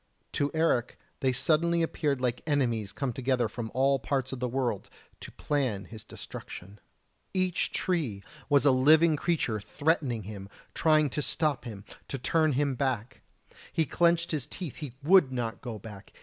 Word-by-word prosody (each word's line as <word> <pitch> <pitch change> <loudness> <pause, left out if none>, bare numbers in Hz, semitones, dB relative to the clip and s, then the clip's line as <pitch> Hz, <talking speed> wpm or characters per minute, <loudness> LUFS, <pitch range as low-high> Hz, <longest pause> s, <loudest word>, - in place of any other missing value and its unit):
To 145 - 0
Eric 160 -7 +1 0.2
they 130 - +2
suddenly 165 +5 +2
appeared 150 -4 0
like 125 -1 0
enemies 120 -9 0
come 125 +4 -3
together 125 -1 +1
from 115 0 -5
all 135 +1 +3
parts 130 0 -1
of 130 - -5
the 125 - -1
world 120 -5 -2 0.3
to - - -9
plan 125 -10 -1
his 110 +3 -10
destruction. 100 -1 -9 0.6
Each 185 -1 +1
tree 140 - -1 0.3
was 145 -1 +4
a 140 - +7
living 155 +5 +5
creature 145 -9 0
threatening 140 -1 0
him, 100 -1 -8 0.2
trying 155 -3 +3
to 150 - -1
stop 150 -2 0
him, 105 -4 -8 0.2
to 135 - -4
turn 155 +3 +2
him 140 +1 +1
back! 130 -3 -2 0.5
He 160 - +1
clenched 170 +2 +2
his 150 -4 -2
teeth: 165 -2 -7
he 145 -6 -6
would 170 -4 +6
not 120 -3 -3
go 120 -4 -5
back! 105 -1 -11
135 Hz, 165 wpm, -29 LUFS, 120-155 Hz, 0.6 s, a